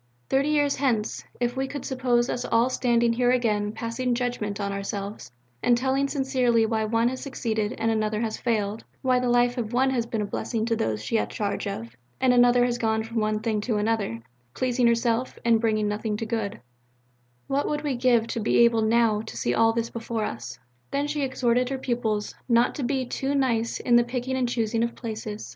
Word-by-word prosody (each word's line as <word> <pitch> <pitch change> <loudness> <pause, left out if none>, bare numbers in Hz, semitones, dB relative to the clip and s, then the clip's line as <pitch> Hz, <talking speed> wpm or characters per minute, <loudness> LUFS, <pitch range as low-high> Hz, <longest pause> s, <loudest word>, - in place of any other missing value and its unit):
Thirty 275 +2 +2
years 290 -2 +2
hence, 240 -6 0 0.2
if 240 0 0
we 265 0 -1
could 285 0 -6
suppose 250 -2 +1
us 245 - -2
all 235 +3 +2
standing 235 -2 +2
here 245 +1 +2
again 215 -5 +1
passing 230 +3 -2
judgment 235 -5 -2
on 200 -1 -2
ourselves, 200 - -5 0.3
and 240 - +4
telling 265 +2 +1
sincerely 260 -5 +2
why 220 -1 0
one 230 +2 +2
has 260 0 -5
succeeded 220 -5 -2
and 225 0 +1
another 215 -1 0
has 220 -2 -1
failed 215 -2 -1 0.2
why 255 -1 +3
the 250 0 0
life 245 +1 +3
of 230 0 -4
one 265 +2 +3
has 235 -3 -1
been 225 -2 -2
a - - -2
blessing 220 +2 -2
to 230 0 +1
those 110 - -2
she 230 - 0
has - - +1
had - - -16
charge 205 -1 -3
of, 115 - -6 0.2
and 255 -1 +4
another 245 0 +5
has 240 -1 -1
gone 220 -1 +1
from 230 +1 -6
one 215 -1 0
thing 220 -2 0
to 220 0 -1
another, 210 - -1 0.3
pleasing 250 -1 +2
herself 235 +1 +1
and 230 -1 +4
bringing 215 -2 +1
nothing 210 +1 -2
to 225 - -3
good 220 -3 -3 0.9
what 275 +1 0
would 295 0 -2
we 285 -3 -1
give 240 -2 +3
to 230 - -4
be 220 - +1
able 235 -1 +5
now 220 -1 +3
to 125 - -9
see 120 0 0
all 225 - +4
this 230 0 -2
before 230 -1 -3
us? 120 +1 -6 0.3
Then 280 +1 -1
she 295 0 -2
exhorted 250 -2 +1
her 270 - -2
pupils 235 -5 -2 0.2
not 235 +1 +4
to - - -5
be 260 +1 0
too 270 +3 -2
nice 235 -4 0
in 240 -1 +4
the 240 - +5
picking 250 +2 -3
and 255 -2 0
choosing 230 -1 0
of 235 0 -1
places. 215 - -6
235 Hz, 210 wpm, -25 LUFS, 220-250 Hz, 0.9 s, another